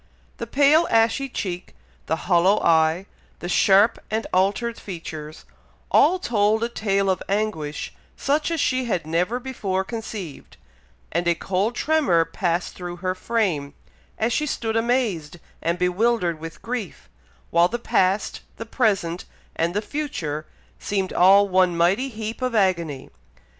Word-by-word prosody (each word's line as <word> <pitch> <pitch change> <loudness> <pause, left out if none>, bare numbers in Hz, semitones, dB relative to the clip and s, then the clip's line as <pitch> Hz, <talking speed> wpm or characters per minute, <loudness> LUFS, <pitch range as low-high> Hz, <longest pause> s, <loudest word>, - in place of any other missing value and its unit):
The - - -5
pale 295 +4 +4
ashy 230 +4 +2
cheek, 185 -6 -5 0.3
the 160 - +1
hollow 185 +3 +4
eye, 160 +2 +3 0.3
the 175 - -6
sharp 200 +5 +4
and 220 +1 -1
altered 205 +6 +1
features, 160 -4 -8 0.5
all 345 +6 +5
told 220 - +1
a 235 - 0
tale 200 -4 0
of 190 -1 +1
anguish 195 -8 -2 0.2
such 300 +3 0
as 330 -1 -1
she 255 -2 +1
had 185 -9 -1
never 180 +9 0
before 205 -7 -2
conceived, 210 - -7 0.5
and 170 +2 -1
a 170 - +3
cold 195 +7 -1
tremor 285 - +2
passed 170 +1 -2
through 175 -1 -6
her 185 +1 -2
frame, 185 -9 -1 0.4
as 225 +2 0
she 300 +3 0
stood 225 -5 -2
amazed 225 - 0 0.2
and 170 +1 0
bewildered 180 -1 +1
with 165 0 -9
grief, 230 -6 -5 0.4
while 170 +1 +5
the 240 - -3
past, 195 -3 0 0.2
the 225 - -6
present, 195 -8 0 0.3
and 170 +3 -1
the 210 - 0
future 200 - -4 0.3
seemed 195 -2 -2
all 195 +3 +6
one 185 -2 +2
mighty 195 +11 +2
heap 220 0 -6
of 255 -2 -1
agony. 170 -9 0
195 Hz, 140 wpm, -23 LUFS, 175-230 Hz, 0.5 s, all